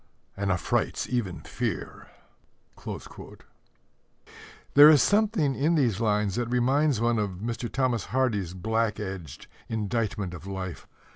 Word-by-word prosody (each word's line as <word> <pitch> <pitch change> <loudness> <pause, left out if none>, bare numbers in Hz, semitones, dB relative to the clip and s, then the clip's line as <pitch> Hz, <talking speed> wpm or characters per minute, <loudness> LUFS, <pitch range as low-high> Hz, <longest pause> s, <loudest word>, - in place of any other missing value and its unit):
And 100 0 -1
affrights 90 - -1
even 105 -8 -2
fear. - - -4 2.7
There 145 +2 +10
is 150 -3 +6
something 205 -9 +2
in 155 +6 +1
these 120 - +1
lines 105 -3 +1
that 120 -1 -1
reminds 130 +2 +2
one 115 -1 +1
of 105 -1 0
Mr. 115 +3 -4
Thomas 125 -5 0
Hardy's 105 -9 -1
black 110 +2 -1
edged 95 -8 -7 0.2
indictment 105 -3 -2
of 90 +2 -9
life. 95 -2 -6
115 Hz, 120 wpm, -27 LUFS, 100-130 Hz, 2.7 s, There